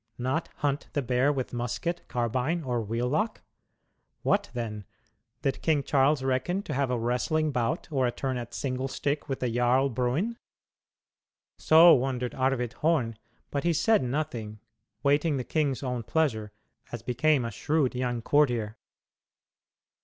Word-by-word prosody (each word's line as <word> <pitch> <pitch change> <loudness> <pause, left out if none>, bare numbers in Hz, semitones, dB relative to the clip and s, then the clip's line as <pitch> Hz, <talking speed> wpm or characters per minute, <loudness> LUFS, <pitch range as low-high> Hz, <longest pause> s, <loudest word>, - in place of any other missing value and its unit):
Not 130 +7 -1
hunt 145 -1 -1
the 145 - 0
bear 125 +3 +2
with 130 -4 -3
musket, 125 +9 -3
carbine, 125 +8 -1
or 125 -3 -1
wheel 115 +3 -2
lock? 210 - -1 0.8
What 200 0 +1
then 105 -4 -4 0.6
did 135 -2 -1
King 150 -3 +2
Charles 140 0 +2
reckon 135 +9 0
to - - -5
have 135 -1 0
a 125 - 0
wrestling 125 +7 0
bout 125 +5 -1
or 130 -4 +2
a - - 0
turn 130 +2 -3
at 120 -1 -6
"single 130 -1 -2
stick" 145 +2 -2
with 135 - -3
the 125 - 0
Jarl 125 +3 +3
Bruin? 135 - -1 1.2
So 165 +2 +8
wondered 125 -1 0
Arvid 130 -2 0
Horn, 145 -9 +1 0.4
but 140 - -1
he 170 0 +2
said 215 +8 +3
nothing, 120 -5 -3 0.4
waiting 145 +1 +2
the 130 - -2
king's 145 -1 -1
own 125 -2 -2
pleasure, 115 -4 0 0.4
as 120 -2 -6
became 125 +2 +2
a 115 - -3
shrewd 145 +4 0
young 125 -2 -2
courtier. 120 -7 +2
130 Hz, 150 wpm, -28 LUFS, 120-150 Hz, 1.2 s, So